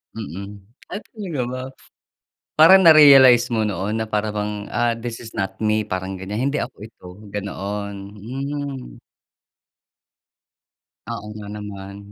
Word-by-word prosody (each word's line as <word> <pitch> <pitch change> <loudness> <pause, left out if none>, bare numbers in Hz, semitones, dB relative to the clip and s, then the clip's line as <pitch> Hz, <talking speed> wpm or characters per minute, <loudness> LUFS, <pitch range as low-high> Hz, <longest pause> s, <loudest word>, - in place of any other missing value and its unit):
Mm. 100 0 -7 0.3
Ay 200 - -3
talaga 185 - -5
ba? 130 - -4 0.9
Parang 185 +5 +8
na-realize 135 -6 +8
mo 110 -2 0
noon 105 +2 -2
na 110 - -1
para 105 0 -1
bang, 105 0 -4
ah, 120 +1 +1
"This 115 0 -6
is 115 -1 -11
not 95 0 -3
me", 110 0 +1
parang 95 -2 -4
gan'yan, 95 +3 -5
"Hindi 150 - -1
ako - - -6
ito", 110 -5 -15 0.3
ganoon, 100 0 -4 0.3
hmm. 135 - -6 2.1
Oo 105 -2 -6
nga 105 -1 -8
naman. 100 -1 -8
110 Hz, 130 wpm, -21 LUFS, 100-130 Hz, 2.1 s, Parang